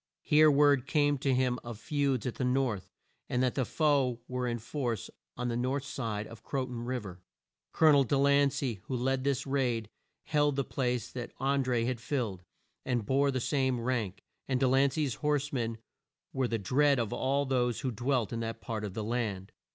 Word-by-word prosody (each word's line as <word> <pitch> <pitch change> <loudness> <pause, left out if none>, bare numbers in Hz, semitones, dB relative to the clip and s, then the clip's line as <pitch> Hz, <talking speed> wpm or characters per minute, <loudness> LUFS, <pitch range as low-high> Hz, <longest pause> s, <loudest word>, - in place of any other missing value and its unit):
Here 155 0 +6
word 140 -2 +4
came 145 0 +2
to 135 - +1
him 125 -1 +1
of 120 -2 -7
feuds 140 -2 0
at 125 - -1
the - - -4
North, 125 -6 0 0.4
and 125 +1 +1
that 125 - +1
the 130 - 0
foe 140 -6 +2
were 125 0 -2
in 120 -1 -1
force 120 -2 -3 0.3
on 125 0 -2
the 120 - -1
north 130 +3 -1
side 110 -7 -3
of 115 - -11
Cro 135 -2 -2
ton 120 -2 -6
Riv 125 -3 -3
er. 90 -1 -9 0.5
Col 160 - +5
o - - +8
nel 140 -1 +6
De 140 - +1
lan 140 0 +4
cey, 125 -6 -3
who 130 - -3
led 130 +1 0
this 140 -2 0
raid, 125 -6 -1 0.3
held 145 -2 +2
the 140 - +1
place 125 -4 -2
that 120 -2 -6
An 135 0 +1
dré 120 -2 +1
had 120 -2 -2
filled, 115 -10 -2 0.4
and 120 -4 -1
bore 140 +4 +2
the 130 -1 0
same 130 -1 0
rank, 115 -5 -2 0.2
and 130 -2 0
De 130 - +3
lan 135 +2 +4
cey's 145 -3 -1
horse 150 -1 0
men 115 -3 -1 0.6
were 130 -1 +1
the 115 - -1
dread 140 +8 +3
of 115 -4 -1
all 140 +2 +1
those 125 -3 0
who 130 -3 -1
dwelt 120 0 0
in 115 - -2
that 115 0 -4
part 110 -3 -4
of 100 -3 -5
the 110 - -2
land. 105 -4 -2
130 Hz, 210 wpm, -30 LUFS, 115-140 Hz, 0.6 s, o